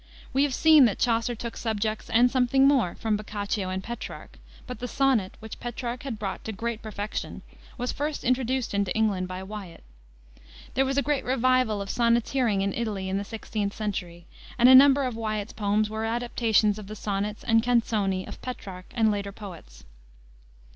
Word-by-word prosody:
We 270 - +3
have 285 -2 +2
seen 315 -4 +7
that 215 - +1
Chaucer 230 0 +1
took 230 +1 -6
subjects 220 -1 -2
and 240 +2 +4
something 265 +1 +4
more 255 -11 +2
from 220 -2 -1
Boccaccio 205 -2 -3
and 190 0 -3
Petrarch. 235 +3 -8 0.3
But 250 - -7
the 245 - -4
sonnet, 250 -7 +1
which 220 -1 -9
Petrarch 240 0 -4
had 270 -6 -5
brought 200 -2 -4
to 220 - -3
great 230 +1 -4
perfection, 210 -1 -5 0.3
was 245 0 -2
first 295 +1 -3
introduced 255 -1 0
into 200 -2 0
England 205 -4 +1
by 185 +1 -6
Wiat. 195 - -9 0.9
There 270 - +2
was 270 +1 -1
a 280 - +3
great 290 +1 0
revival 255 -4 +2
of 195 - -10
sonneteering 235 -2 +2
in 195 -1 -1
Italy 205 -5 -3
in 195 +1 0
the - - -3
16th 210 -1 -4
century, 180 -5 -4 0.3
and 245 0 +6
a 260 - +9
number 275 +1 +8
of 250 -3 -2
Wiat's 215 -2 -3
poems 210 0 +1
were 220 +1 -4
adaptations 225 -2 +1
of 205 - -9
the 215 - -7
sonnets 210 +1 -3
and 225 -1 +4
canzoni 220 -6 +1
of - - -9
Petrarch 190 -7 -7
and 220 -2 +3
later 200 -1 -3
poets. 180 - -11
220 Hz, 180 wpm, -26 LUFS, 200-245 Hz, 0.9 s, a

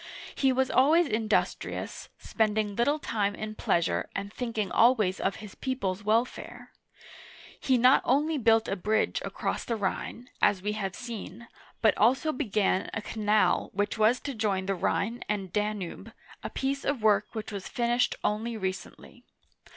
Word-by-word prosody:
He 270 -1 +2
was 260 0 +1
always 315 +7 +5
industrious, 220 -5 -2
spend 215 -1 0
ing 210 -2 -1
little 285 +7 +2
time 205 -8 -1
in 215 0 -5
pleasure, 165 - 0
and 200 +1 -4
thinking 230 -5 -3
always 225 -6 +3
of 195 - 0
his 210 -3 -10
people's 210 -8 -3
Welfare. 225 +4 -1 0.9
He 260 -2 +2
not 250 +3 +6
only 295 +4 +1
built 225 -1 +4
a 195 - -1
bridge 215 +3 0
across - - -3
the 230 - -2
Rhine, 225 +4 -4
— - - -34
as 190 -2 +3
we 210 - 0
have 195 -3 -3
seen, 235 -2 -8 0.2
— - - -28
but 220 - +5
also 265 +8 +3
began 210 -8 0
a 220 - -2
canal 215 -1 +1
which 205 +1 -1
was 225 +3 +4
to 280 - -4
join 205 -5 -1
the 195 - 0
Rhine 220 +5 -1
and 195 -4 -2
Danube, 210 -4 -3 0.3
a - - -5
piece 275 +1 -2
of 280 -6 -1
work 210 0 +2
which 220 0 -5
was 200 -2 -6
finished 240 +1 +1
only 220 +2 -1
recently. 190 -2 -6
215 Hz, 165 wpm, -28 LUFS, 205-245 Hz, 0.9 s, not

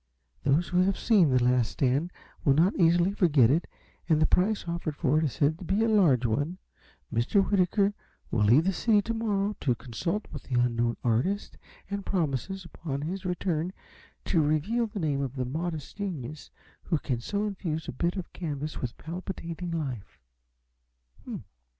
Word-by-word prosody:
Those 145 +5 +2
who 180 - +2
have 195 +1 +2
seen 200 -9 +4
'The 125 -2 +3
Last 125 -2 +2
Stand' 140 +6 +1 0.3
will 135 - +4
not 175 +7 +4
easily 175 +2 +4
forget 145 - +4
it, 160 +5 +1 0.4
and 155 -2 +4
the 155 - +5
price 190 +3 +1
offered 170 -3 -3
for 150 0 +2
it 160 - +1
is 140 - -2
said 155 +3 +1
to - - -8
be 195 +5 +1
a - - +3
large 170 - +4
one. 145 +10 0 0.6
Mr. 190 - +3
Whitaker 200 +1 +2 0.4
will 110 - +2
leave 120 +9 +6
the 190 +2 +1
city 210 +1 +3
to 230 - -2
morrow 210 -2 0
to 125 -4 +1
consult 170 - -3
the 130 -4 -2
unknown 120 -1 +1
artist, 125 - 0 0.3
and 200 0 -4
promises, 180 - -2
upon 145 -4 -5
his 185 +5 -4
return, 180 -1 -1 0.5
to 170 - +3
reveal 155 +11 +1
the 210 0 -9
name 145 -5 0
of 135 -1 -3
the 130 -1 -1
modest 155 +4 -4
genius 155 - -5 0.4
who 165 - +1
can 130 -4 -2
so 205 - -1
infuse 170 -6 -3
a - - -3
bit 170 +8 -1
of 190 -3 -6
canvas 150 -3 -4
with 120 -2 -4
palpitating 175 +1 -6
life." 135 - -4
165 Hz, 170 wpm, -28 LUFS, 135-190 Hz, 0.6 s, leave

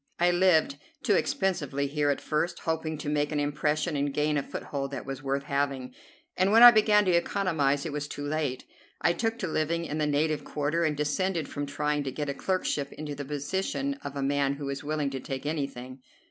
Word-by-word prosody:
I 175 +1 +4
lived 185 - +3 0.2
too - - +3
expensively 175 - 0
here 145 +1 0
at 140 - +1
first, 170 +3 -1
hoping 160 -1 -2
to 145 - -7
make 150 0 0
an 150 - 0
impression 150 +2 0
and 140 0 0
gain 150 +2 +1
a 145 - +2
foothold 140 0 -5
that 135 -2 -6
was 135 0 -5
worth 140 0 -1
having, 140 -3 -2 0.4
and 185 +2 +2
when 225 +2 +7
I 240 - +13
began 210 -2 +4
to 185 - +3
economize 165 -6 +1
it 155 - -4
was 145 -1 -3
too 145 0 -6
late. 145 -4 -2 0.4
I 170 - +3
took 225 +3 -1
to 195 - -3
living 165 +1 -1
in 155 -1 -3
the 150 - +1
native 150 +1 +1
quarter, 150 +3 -1
and 155 -3 0
descended 160 +2 0
from 145 0 -4
trying 150 +1 -1
to 135 - -2
get 145 +2 -3
a - - -1
clerkship 145 -4 -1
into 150 -1 -6
the 145 0 -6
position 190 - -2
of 140 - -6
a 140 - -2
man 140 0 +1
who 140 -1 -5
is 140 0 -4
willing 150 -1 -1
to 135 - -4
take 135 +1 -5
anything. 135 -4 -4
150 Hz, 215 wpm, -28 LUFS, 140-170 Hz, 0.4 s, I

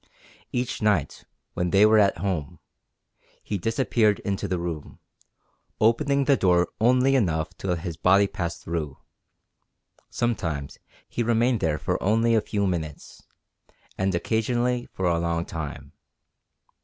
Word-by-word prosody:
Each 125 -1 -2
night, 100 -9 0 0.3
when 90 0 -1
they 100 +3 +5
were 110 0 +5
at 100 -1 +3
home, 85 -3 -3 0.9
he 100 - -3
disappeared 115 -1 +1
into 100 -1 -2
the 90 - -1
room, 85 -3 -5 0.8
opening 140 +5 +2
the 140 0 +4
door 90 -5 +2
only 125 +4 +4
enough 80 -10 0
to - - -5
let 90 -3 -1
his 85 -3 -5
body 100 +4 +4
pass 85 -4 -4
through; 80 -4 -4 1.1
sometimes 80 -12 -2 0.3
he - - -3
remained 120 +1 +2
there 80 -2 0
for - - -2
only 115 +3 +2
a 110 - +4
few 100 -1 -1
minutes, 80 -5 -4 0.7
and 95 -1 0
occasionally 120 +6 0
for 95 - -3
a 85 -1 +2
long 85 0 -1
time. 80 -3 -7
100 Hz, 135 wpm, -25 LUFS, 85-115 Hz, 1.1 s, they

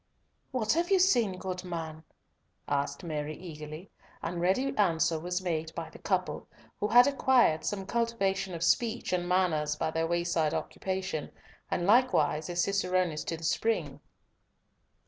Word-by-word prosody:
"What 230 -5 +1
have 340 +2 0
you 390 - +5
seen, 240 - +3
good 185 -1 -5
man?" 160 -3 -5 0.6
asked 145 +5 -1
Mary 155 -2 -4
eagerly, 155 +1 -9 0.3
and 170 +1 -3
ready 255 +11 +1
answer 165 -5 +2
was 180 +3 -3
made 160 -3 -2
by - - -5
the - - -13
couple, - - -2 0.3
who 210 - 0
had 245 +3 +7
acquired 260 - +3
some 195 -2 -2
cultivation 195 -5 -1
of 165 - -4
speech 230 +4 +1
and 175 -1 -1
manners 160 -5 +1
by 160 - -1
their 165 0 0
wayside 170 -2 0
occupation, 190 -5 -3 0.4
and 175 - -1
likewise 210 -8 +3
as 175 0 +1
cicerones 185 -5 0
to 165 - -3
the 165 - -12
spring. 225 +7 0
180 Hz, 145 wpm, -30 LUFS, 160-210 Hz, 0.6 s, had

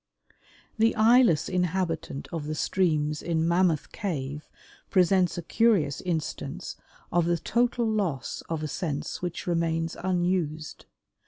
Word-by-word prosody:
The 225 +1 +4
eyeless 220 - +5
inhabitant 180 -5 -1
of 160 -3 -4
the 155 - -2
streams 150 -4 0
in 165 -1 0
Mammoth 170 -3 +2
Cave 150 -8 -4 0.4
presents 185 -1 +3
a 175 - -4
curious 190 -9 +2
instance 165 -1 -4 0.4
of 175 -1 +2
the 170 0 +2
total 240 +6 +1
loss 195 - -1
of 160 -2 -2
a - - -1
sense 150 -2 -3
which 175 -1 -4
remains 165 -1 0
unused. 175 -4 -1
170 Hz, 120 wpm, -27 LUFS, 155-190 Hz, 0.4 s, eyeless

